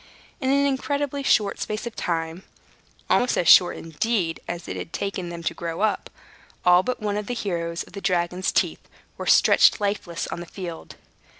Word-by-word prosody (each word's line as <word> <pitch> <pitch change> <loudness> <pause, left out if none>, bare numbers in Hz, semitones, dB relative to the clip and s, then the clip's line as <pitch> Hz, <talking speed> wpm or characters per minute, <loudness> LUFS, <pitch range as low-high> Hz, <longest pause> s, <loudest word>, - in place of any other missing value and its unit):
In 260 -4 -1
an 280 +1 +3
incredibly 280 +1 -1
short 210 -7 +2
space 215 +2 -3
of 235 - -6
time 165 0 -2 0.7
(almost 245 - +2
as 175 - +1
short, 180 - +7
indeed, 165 +1 -1
as 175 -1 -5
it - - -4
had - - -6
taken 195 -3 -3
them 170 -1 -7
to - - -1
grow 165 +1 -5
up), 215 -1 0 0.6
all 180 0 +7
but 250 +6 -3
one 205 -1 -1
of 210 -1 -4
the 245 - -2
heroes 170 -6 -3
of - - -18
the 200 - -7
dragon's 180 0 0
teeth - - 0 0.3
were - - -7
stretched - - +5
lifeless 200 -5 -2
on - - -5
the 175 - -8
field. 175 -4 -8
185 Hz, 185 wpm, -24 LUFS, 170-220 Hz, 0.7 s, short